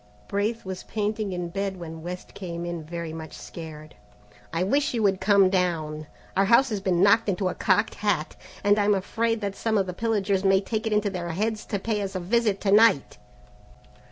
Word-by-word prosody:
Braith 210 +3 -1
was 190 -1 -5
painting 210 -1 -2
in 180 -1 -3
bed 195 +1 -3
when 165 -1 -7
West 180 +2 -7
came 170 -3 -5
in 170 -2 -4
very 170 0 -5
much 160 -1 -8
scared. 155 -2 -9 0.6
"I 165 +2 0
wish 275 +7 +1
you 225 - 0
would 195 -2 +2
come 200 0 +5
down; 160 -5 -1 0.3
our 195 - +4
house 240 +6 +5
has 210 -3 -2
been 185 -1 +2
knocked 210 +2 +5
into 185 -1 0
a - - -3
cocked 185 -3 +1
hat, 200 -7 -1 0.3
and 205 +1 +4
I'm 205 0 +3
afraid 225 +4 -1
that 200 -1 -3
some 220 0 0
of 195 - +2
the 180 - -5
pillagers 200 -2 0
may 195 -1 +5
take 215 +2 -3
it 220 - 0
into 210 -1 +1
their 175 -2 -4
heads 215 +5 -2
to 205 - -1
pay 210 +1 -2
us 195 -1 -4
a - - 0
visit 210 +2 +1
to 195 - +1
night." 210 -9 +4
195 Hz, 205 wpm, -26 LUFS, 175-210 Hz, 0.6 s, come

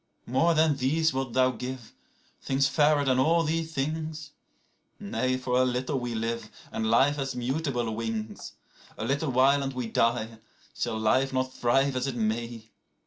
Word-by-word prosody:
29More 165 +7 +2
than 155 -2 +3
these 160 +5 +1
wilt 130 -2 -3
thou 130 0 +4
give, 125 -2 -7 0.5
things 135 +1 +1
fairer 150 -1 +3
than 130 -1 +2
all 165 +5 +3
these 160 +1 -1
things?30Nay, 155 - -5
for 125 0 +1
a - - +5
little 130 +2 -1
we 120 -1 -4
live, 115 0 -3 0.2
and 110 0 -1
life 135 +6 +4
hath 135 -2 -3
mutable 125 -3 -2
wings.31A 110 0 -6
little 140 +3 0
while 135 +3 +4
and 135 -1 -3
we 125 -1 -3
die; 115 0 0 0.3
shall 110 - -2
life 130 +5 +2
not 130 0 -1
thrive 135 +3 +2
as 125 +1 -1
it 135 - -3
may? 115 0 -3
130 Hz, 155 wpm, -27 LUFS, 120-145 Hz, 0.5 s, a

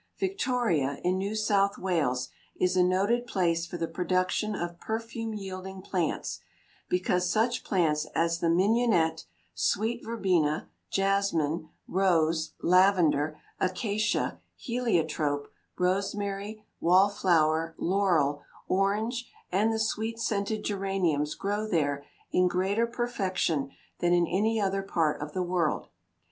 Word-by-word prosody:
Victoria, 245 - 0
in 185 +1 +1
New 200 +3 -2
South 200 -2 +2
Wales, 150 -9 0 0.3
is 180 0 +2
a 185 - +4
noted 200 +7 +1
place 170 -6 0
for 175 - -6
the 165 -1 -2
production 185 +4 0
of 175 -2 -4
perfume 225 0 -4
yielding 190 -1 -7
plants, 180 -5 -2 0.5
because 180 0 +1
such 235 +4 +1
plants 155 -5 +1
as 165 0 +1
the 170 - +1
mignonette, 180 -3 +2 0.3
sweet 215 - 0
verbena, 180 -9 0 0.2
jasmine, 175 -6 0 0.2
rose, 165 -4 +2
lavender, 175 -5 +4 0.2
acacia, 210 +3 0 0.2
heliotrope, 160 - -1 0.3
rosemary, 200 +3 -2
wallflower, 165 -3 +3
laurel, 170 -7 +1 0.3
orange, 215 +6 0 0.2
and 205 +5 +2
the 225 - 0
sweet 220 +1 -1
scented 215 -1 -1
geraniums 190 -7 0
grow 205 +2 -2
there 145 -7 0 0.3
in 180 0 +4
greater 195 +6 +1
perfection 190 - -1 0.3
than 175 0 +2
in 175 -1 +4
any 215 +6 +1
other 195 -1 0
part 165 -7 0
of 150 0 -6
the 185 - 0
world. 175 -3 0
185 Hz, 115 wpm, -28 LUFS, 165-210 Hz, 0.5 s, a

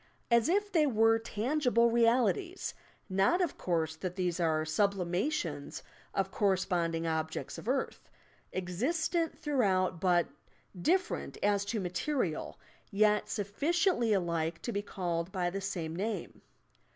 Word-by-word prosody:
as 235 +5 +4
if 410 +3 +1
they 310 -4 +4
were 225 -2 +4
tangible 235 +1 +1
realities, 245 - +2 0.2
— - - -33
not, 195 - +2
of 355 -5 0
course, 160 -3 -1
that 180 +2 -5
these 180 -2 -1
are 160 -2 +1
sublimations 180 - -1 0.3
of 195 0 0
corresponding 175 -4 +1
objects 160 -1 -3
of 230 - -6
earth, 265 +1 -2 0.4
existent 305 - -1
throughout 190 - +1
but 175 -3 +3 0.5
different 355 - 0
as 205 -1 +3
to 210 +2 -2
material, 180 - -2 0.3
yet 210 +1 +2
sufficiently 260 - +1
alike 170 -4 0
to 240 - -2
be 200 - -1
called 175 -3 -3
by 180 -2 -1
the 195 +2 -4
same 170 -5 -3
name. 210 +4 -4
200 Hz, 125 wpm, -31 LUFS, 175-245 Hz, 0.5 s, as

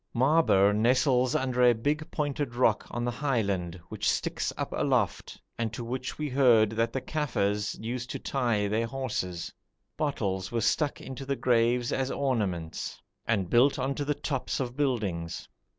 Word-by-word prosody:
Maaber 125 -7 +4
nestles 125 +3 +3
under 130 -1 0
a 120 -1 +6
big 150 +7 -1
pointed 145 -5 -2
rock 125 - +2
on 120 0 -3
the 120 - 0
highland, 100 - -1
which - - -1
sticks - - -1
up - - -3
aloft, - - 0 0.2
and 115 -2 -1
to 120 - -5
which 125 +2 -4
we 150 - -2
heard 125 -6 +4
that 115 +1 0
the 135 - -2
Kafirs 105 -10 -1
used 120 +3 -4
to - - -3
tie 120 -6 0
their 110 +3 0
horses. 115 -9 -3 0.4
Bottles 95 -11 -1
were 120 - 0
stuck 145 +6 +1
into 135 +1 -7
the 140 +1 -1
graves 120 -1 +2
as 135 0 0
ornaments, 100 - -2 0.3
and 100 -5 +1
built 120 +8 +4
on 135 +1 -1
to 145 - -3
the 145 +1 -1
tops 135 -3 -2
of 125 -2 -3
buildings. 100 - -2
120 Hz, 165 wpm, -28 LUFS, 105-135 Hz, 0.4 s, a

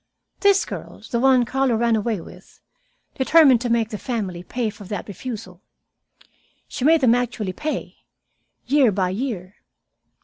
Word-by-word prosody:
This 400 -1 +4
girl - - -8
the 235 - +1
one 255 -1 +4
Carlo 265 0 +1
ran 230 0 +2
away 220 -1 -1
with 165 - -14 0.5
determined 270 -3 +5
to 245 - -2
make 230 -1 +1
the 210 - -6
family 200 -9 -4
pay 225 +4 -3
for 205 0 -13
that 200 0 -5
refusal. 200 -3 -8 1.1
She 280 - -6
made 320 +2 +5
them 240 -3 +5
actually 240 -6 -2
pay, 300 - -4 0.7
year 270 -3 +4
by 185 -2 0
year. 200 -4 -4
235 Hz, 145 wpm, -22 LUFS, 205-265 Hz, 1.1 s, determined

